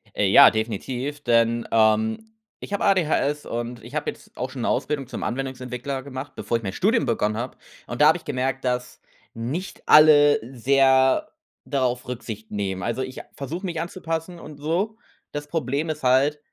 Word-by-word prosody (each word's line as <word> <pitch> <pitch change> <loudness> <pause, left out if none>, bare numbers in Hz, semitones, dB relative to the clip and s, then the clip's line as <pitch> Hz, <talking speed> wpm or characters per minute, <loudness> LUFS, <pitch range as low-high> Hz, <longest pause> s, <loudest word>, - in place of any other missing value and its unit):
Äh, 100 - +2
ja, 95 - +9
definitiv, 125 +6 -3
denn, 115 -1 +2
ähm, 110 - +2 0.3
ich - - -9
habe 200 - -1
ADHS 150 -5 +1
und 120 0 -5
ich - - -12
habe - - -1
jetzt - - -19
auch - - -3
schon - - -7
'ne - - 0
Ausbildung 140 -4 -1
zum - - -6
Anwendungsentwickler 130 +1 -4
gemacht, 140 0 -7
bevor 115 - -1
ich 115 - -10
mein 95 - -3
Studium 225 +5 +2
begonnen 105 -2 0
habe, 120 +3 -5 0.3
und 120 +4 -4
da 150 - +8
habe 160 - +5
ich - - -16
gemerkt, 135 -1 -2
dass 125 0 -3 0.3
nicht 135 +12 -5
alle 145 -1 +7 0.2
sehr 130 +1 +3 0.4
darauf 125 -3 -1
Rücksicht 110 -3 -7
nehmen. 95 -3 -3
Also 120 +3 -2
ich 130 0 -5
a - - -20
versuche 165 +7 -5
mich 165 -3 -3
anzupassen 170 0 -4
und 150 -3 -11
so. 180 +9 -1 0.3
Das 145 0 -5
Problem 145 0 -2
ist 155 -2 -4
halt, 135 +4 +3
130 Hz, 180 wpm, -24 LUFS, 120-150 Hz, 0.4 s, ja